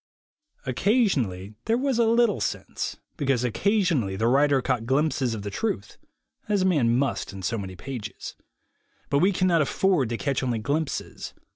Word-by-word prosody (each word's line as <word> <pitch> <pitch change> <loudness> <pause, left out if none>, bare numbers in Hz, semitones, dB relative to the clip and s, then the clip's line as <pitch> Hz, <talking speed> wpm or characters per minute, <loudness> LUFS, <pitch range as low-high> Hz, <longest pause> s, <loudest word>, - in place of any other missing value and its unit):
Occa 200 - +2
sionally 105 - -1
there 225 +2 +2
was 265 -2 0
a 230 - +4
little 235 +1 +3
sense, - - -3 0.2
because 135 -5 +1
occasionally 140 - +1
the 110 +4 +1
writer 140 +2 +4
caught 120 -2 -1
glimpses 135 -3 +1
of 105 - -6
the 100 - -4
truth, 110 - -3 0.5
as 205 -3 +2
a - - +2
man 130 -10 +3
must 140 +1 -1
in 95 -1 -8
so 115 +2 -1
many 95 -2 -6
pages. 110 0 -7 0.8
But 140 - +3
we 190 +5 +4
cannot 180 -3 +2
afford 150 -3 +1
to 115 - -2
catch 140 0 -1
only 125 -3 0
glimpses. 145 +7 -3
135 Hz, 165 wpm, -25 LUFS, 115-185 Hz, 0.8 s, a